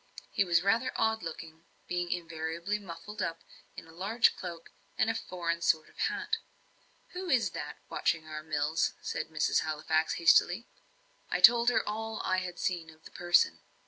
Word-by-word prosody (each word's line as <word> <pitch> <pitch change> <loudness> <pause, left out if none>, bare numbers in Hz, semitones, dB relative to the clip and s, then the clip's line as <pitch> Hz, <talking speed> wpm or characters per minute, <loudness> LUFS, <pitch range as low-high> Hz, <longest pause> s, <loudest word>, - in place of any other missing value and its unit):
He 200 - +2
was 170 -2 +2
rather 225 +6 +2
odd 220 0 +1
looking, 165 0 -8 0.2
being 175 0 -2
invariably 170 +3 -3
muffled 205 +2 -8
up 165 -2 -3 0.3
in - - -9
a 160 - -15
large 200 +8 +2
cloak 170 -2 -8 0.3
and 225 - +3
a - - -3
foreign 170 -6 -3
sort 160 -2 +2
of - - -23
hat. 420 0 0 0.7
"Who 365 0 -6
is 230 - +3
that, 150 -2 -6
watching 160 -1 0
our 155 -1 -6
mills?" 155 +1 0
said 155 - -3
Mrs. 155 -1 +1
Halifax, 155 +1 0
hastily. 175 +5 +4 0.6
I - - 0
told 235 0 +8
her 245 - +1
all 220 +1 -3
I 185 - +1
had 180 -1 -4
seen 170 -3 -2
of 160 0 -17
the - - -12
person. 175 0 +3
175 Hz, 170 wpm, -30 LUFS, 160-215 Hz, 0.7 s, told